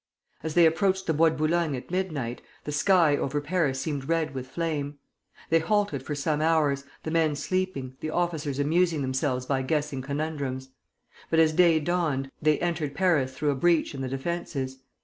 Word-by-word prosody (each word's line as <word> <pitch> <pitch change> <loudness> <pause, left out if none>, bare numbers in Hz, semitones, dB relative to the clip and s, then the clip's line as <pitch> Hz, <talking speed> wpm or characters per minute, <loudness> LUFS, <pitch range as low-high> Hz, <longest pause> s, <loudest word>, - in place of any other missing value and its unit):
As 160 0 -4
they 170 -1 +7
approached 190 +4 +2
the 160 - +1
Bois 160 +2 +5
de 160 - -4
Boulogne 155 -1 +1
at 125 +4 -8
midnight, 155 -11 -2 0.2
the 150 - -4
sky 160 0 +4
over 145 +1 -1
Paris 145 -3 0
seemed 140 -1 -3
red 165 -3 0
with 130 -1 -5
flame. 150 -2 -3 0.5
They 165 - +5
halted 185 -4 0
for 150 +2 -4
some 150 +1 0
hours, 150 -4 +2 0.2
the 160 - -3
men 160 -2 +2
sleeping, 145 -7 -2
the 155 - -4
officers 155 -5 -1
amusing 160 +1 +2
themselves 130 -1 -1
by 135 0 0
guessing 145 0 -1
conundrums; 140 -2 -3 0.6
but 165 - +1
as 160 -1 +5
day 170 -1 +5
dawned, 150 -5 -1
they 155 0 +3
entered 160 -5 -1
Paris 150 -9 +2
through 150 -1 +1
a - - -1
breach 165 +4 +2
in 135 - -5
the 130 - -3
defences. 135 -2 -3
150 Hz, 180 wpm, -27 LUFS, 135-165 Hz, 0.6 s, they